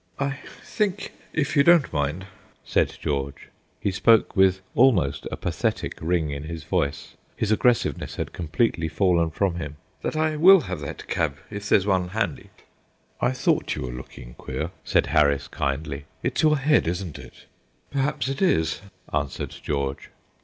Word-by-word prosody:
"I 140 0 -1 0.2
think, 205 -2 -2 0.2
if 150 -3 -1
you 140 - +6
don't 170 - +5
mind," 75 +5 -1 0.4
said - - +1
George 70 -1 -3 0.3
he 100 - 0
spoke 110 +3 +4
with 95 -1 +4
almost 95 - +3
a - - -5
pathetic - - -2
ring 80 -2 0
in 70 +1 -5
his 80 -1 -6
voice, 80 -4 -2 0.2
his 110 - -1
aggressiveness 120 +2 +1
had - - -4
completely 85 +1 0
fallen 85 -1 +2
from 90 +1 0
him, 75 -3 -5 0.3
"that - - -3
I 155 0 +1
will 185 +3 +8
have 90 - -5
that 70 - -7
cab, 75 -3 -1
if 105 0 -5
there's 95 - +4
one 95 -3 +1
handy." 110 +5 -3 0.7
"I 125 - +3
thought 130 - 0
you - - -4
were 65 - -4
looking - - -10
queer," - - -4
said - - +2
Harris, 70 -1 +2
kindly. 70 0 -3 0.2
"It's - - 0
your 155 -1 +4
head, 145 - +3
isn't 85 -2 -3
it?" - - -14 0.5
"Perhaps 140 0 0
it 135 +4 -3
is," 80 - +2 0.3
answered 70 -2 -2
George. 70 -1 -3
90 Hz, 160 wpm, -25 LUFS, -, 0.7 s, will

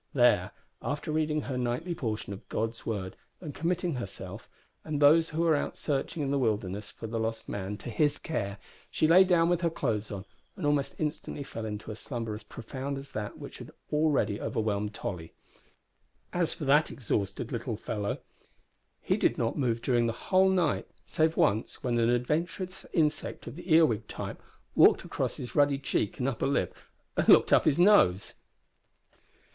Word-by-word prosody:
There, 120 -8 +4 0.3
after 150 +2 -3
reading 155 0 +1
her 130 -3 -3
nightly 125 +9 -1
portion 110 -8 -3
of 95 - -11
God's 115 +1 -3
Word 100 -5 -3 0.2
and 155 -5 -7
committing 175 +2 -1
herself, 100 -3 -7 0.3
and 155 -2 -2
those 160 +3 +6
who 160 +2 -1
were 165 -2 +4
out 145 - -2
searching 145 +1 -2
in 135 - -1
the 140 - +2
wilderness 105 -4 -1
for - - -9
the 115 +1 -3
lost 115 0 -3
man, 100 +1 -4
to 120 - -7
His 145 +6 +2
care, 100 -10 -3 0.3
she 155 - +2
lay 180 +4 +8
down 175 -3 +3
with 175 -1 +1
her 170 - +2
clothes 110 -10 -2
on, 100 -1 -6 0.3
and 180 - -3
almost 145 -1 +1
instantly 150 -1 -3
fell 115 -4 -6
into 105 +1 -5
a - - -6
slumber 115 -1 -4
as 105 - -6
profound 135 +4 -6
as 135 +1 -9
that 105 -1 -5
which - - -9
had - - -9 0.2
already 145 -10 +2
overwhelmed 105 -1 -1
Tolly. 85 -4 -5 1.0
As 175 -2 +1
for 150 - -5
that 150 +3 +4
exhausted 100 -6 -2
little - - -3
fellow, 100 -1 -3 0.8
he - - +1
did - - +2
not 115 - 0
move 120 -5 0
during 120 -2 +2
the 115 - -1 0.2
whole 190 0 +6
night, 180 -5 +1 0.2
save 160 +1 +1
once, 110 +3 +1
when 120 -2 +1
an 115 0 +3
adventurous 165 - -1
insect 155 -2 0
of - - -7
the 175 +1 -7
earwig 155 -10 +4
type - - -6 0.3
walked - - +6
across - - -2
his 120 -2 -6
ruddy 145 -1 +4
cheek 135 -6 -1
and 125 - -1
upper 135 -2 -1
lip 140 - 0 0.4
and - - +1
looked - - +7
up - - +5
his 150 -3 +3
nose. 175 - +5
135 Hz, 180 wpm, -29 LUFS, 110-155 Hz, 1.0 s, lay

